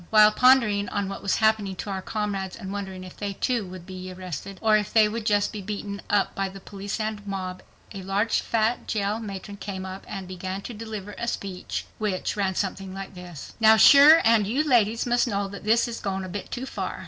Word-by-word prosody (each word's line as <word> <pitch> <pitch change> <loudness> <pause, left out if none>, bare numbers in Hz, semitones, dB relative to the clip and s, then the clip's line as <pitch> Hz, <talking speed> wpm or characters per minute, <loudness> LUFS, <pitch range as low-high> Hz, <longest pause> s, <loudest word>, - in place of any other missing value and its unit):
While 215 -1 +7
pondering 225 -4 +4
on 200 -1 -2
what 195 - -6
was 200 - +1
happening 220 -3 +2
to 200 - -5
our 190 -1 -3
comrades 195 -2 -3
and 190 +1 -7
wondering 190 -2 -5
if 185 - -11
they, 205 -1 -3
too, 235 -1 -1
would 180 -1 -10
be 185 0 -7
arrested, 185 +1 -7
or 220 -1 +4
if 210 -2 0
they 220 -2 +5
would 220 +1 -4
just 205 -1 +2
be 210 - -5
beaten 200 0 -5
up 205 -1 +2
by 195 -2 -2
the 195 +1 -10
police 200 +2 -6
and 215 -1 -3
mob, 185 -2 -4 0.3
a 195 - -6
large, 200 +4 0
fat 230 +1 0
jail 210 0 -1
matron 200 -1 -7
came 190 -2 -5
up 190 +1 -7
and 195 -2 -6
began 185 +1 -5
to 245 - -6
deliver 210 -2 -7
a 235 - -3
speech, 195 -5 -4
which, 205 -4 -1
ran 195 -2 0
something 190 0 -3
like 195 0 -7
this: 180 -4 -10
"Now, 220 0 +7
shure 290 +7 +9
and 220 -3 +4
you 280 +8 0
ladies 230 -3 +3
must 240 0 +2
know 200 -3 -1
that 200 +1 -9
this 230 +3 +3
is 235 -1 -5
goin' 195 -1 -3
a 185 - -6
bit 195 +2 -6
too 255 +1 -4
far. - - -4
200 Hz, 220 wpm, -25 LUFS, 190-220 Hz, 0.3 s, shure